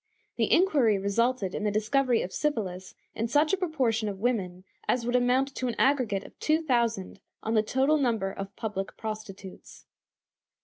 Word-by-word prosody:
The - - +1
inquiry 290 - +4
resulted 200 +1 0
in - - -3
the 210 - +2
discovery 230 +4 +1
of 180 - -6
syphilis 195 -11 -2 0.2
in 225 - -2
such 295 +7 +2
a - - +3
proportion 255 - 0
of 195 - -5
women 190 -6 -1 0.2
as 240 -2 +1
would 245 +1 0
amount 255 +2 +2
to 255 - -3
an 240 - -2
aggregate 245 -8 +2
of - - -15
two 315 +1 +1
thousand 235 -9 0 0.2
on 220 - -1
the 220 - +4
total 265 +7 +2
number 225 -8 0
of 195 0 -7
public 200 -3 -4
prostitutes. 215 -3 -8
230 Hz, 170 wpm, -28 LUFS, 200-265 Hz, 0.2 s, inquiry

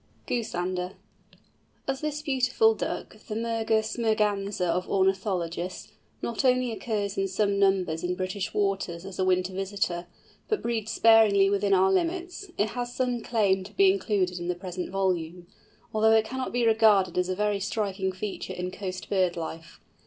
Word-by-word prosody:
GOOSANDER. 185 -5 -2 0.9
As 270 0 -2
this 300 0 -3
beautiful 255 -6 +3
Duck, 215 - -5
the 215 - -4
Mergus 225 0 0
merganser 210 -4 +1
of 180 +1 -1
ornithologists, 190 -2 -1 0.3
not 235 +2 -2
only 255 -1 +3
occurs 210 -3 -2
in 195 - +1
some 200 +1 0
numbers 190 -5 +2
in 180 0 -1
British 185 +1 -3
waters 195 -4 -1
as 195 -1 -8
a - - +3
winter 185 0 +1
visitor, 190 -2 -2 0.4
but 430 - -1
breeds 225 -2 -2
sparingly 215 -3 +5
within 200 0 +2
our 190 +1 +4
limits, 355 - -1
it 210 +2 +1
has 245 +2 -4
some 250 -2 0
claim 200 -5 +1
to 190 - -12
be 390 -1 +5
included 195 - 0
in 175 - -5
the 180 - 0
present 180 0 -5
volume, 180 -3 -1 0.5
although 220 +1 +4
it 220 0 +4
cannot 260 +3 -4
be 240 0 +1
regarded 215 -5 +4
as 180 0 0
a 185 - 0
very 210 0 0
striking 195 -1 -1
feature 190 +2 -5
in 180 0 -4
coast 185 -1 -6
bird 185 -3 +1
life. 160 0 -7
200 Hz, 160 wpm, -27 LUFS, 185-225 Hz, 0.9 s, sparingly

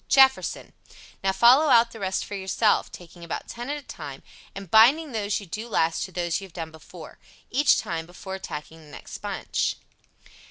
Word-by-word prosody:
JEFFERSON. 265 -1 +3 0.5
Now 195 - +3
follow 245 +10 +6
out 235 -2 +5
the 225 - -10
rest 190 -1 -2
for - - -9
yourself, 200 +2 +1
taking 175 0 -12
about 170 - -5
ten 240 +3 -7
at 295 - -2
a 290 - -10
time, 140 -4 -9 0.3
and 195 -3 -9
binding 275 +8 +6
those 210 -3 -1
you 200 - -10
do 215 +7 -6
last 165 -6 +1
to 190 - -12
those 175 0 -2
you - - -7
have 175 - -24
done 165 -2 -6
before, 160 +1 -13 0.3
each 285 +4 +4
time, 165 -1 -3
before 185 +2 -9
attacking 160 -3 -7
the 155 - -16
next - - -10
bunch. - - -2
190 Hz, 190 wpm, -25 LUFS, 170-235 Hz, 0.5 s, follow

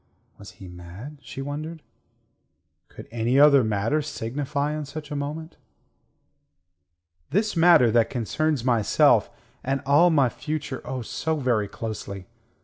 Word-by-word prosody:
Was 100 - -12
he 95 - -12
mad, 90 - -10
she 135 +1 -7
wondered. 155 +3 -6 1.0
Could - - -12
any 120 +3 +1
other 140 -2 +7
matter 110 +8 0
signify 145 +1 -3
in 155 -1 -4
such 150 +1 -8
a - - -3
moment. 150 +3 -5 1.7
"This 205 +7 0
matter 165 -8 +6
that 115 0 +3
concerns 140 +3 -1
myself; 120 -5 +3 0.3
and 135 +1 -1
all 145 +6 +5
my 145 -6 +4
future, 150 +1 -5
oh, 130 -2 -4
so 160 +7 -2
very 120 -8 0
closely. 100 -3 -6
140 Hz, 130 wpm, -24 LUFS, 115-150 Hz, 1.7 s, other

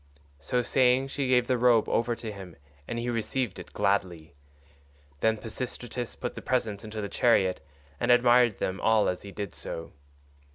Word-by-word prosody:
So 125 -1 -1
saying 130 +1 +3
she 140 -1 -2
gave 125 -1 +3
the 125 -1 0
robe 120 -3 +4
over 120 0 +1
to 115 -2 -6
him 95 -4 -10 0.3
and 120 - -4
he 120 +1 -2
received 115 -1 -2
it - - -10
gladly. 95 -6 -1 0.9
Then 110 +4 +2
Pisistratus 120 +1 -5
put 125 - -4
the - - -8
presents 115 -5 -1
into 110 0 -6
the 100 - -3
chariot, 95 - +2 0.4
and - - -1
admired 120 -2 +5
them 95 +1 -3
all 110 -1 +3
as 90 - -2
he 100 - -9
did 100 -3 -5
so. 80 - -7
115 Hz, 170 wpm, -28 LUFS, 100-125 Hz, 0.9 s, admired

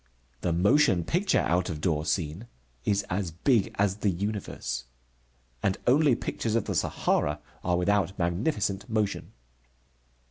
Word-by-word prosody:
The 90 - 0
motion 95 - +4
picture 185 - +2
out 90 +2 +1
of 80 -3 -4
door 75 -1 0
scene 85 +6 -2 0.4
is 100 -1 +2
as 95 0 -1
big 100 - +1
as 100 -1 +1
the 105 - +1
universe. 100 - -3 0.8
And 95 +3 +1
only 140 0 +5
pictures 115 -1 -2
of 115 - +1
the - - -2
Sahara 75 +1 0 0.2
are 90 0 +1
without 100 +1 +1
magnificent 100 - -1
motion. 110 -2 -1
100 Hz, 135 wpm, -28 LUFS, 85-110 Hz, 0.8 s, only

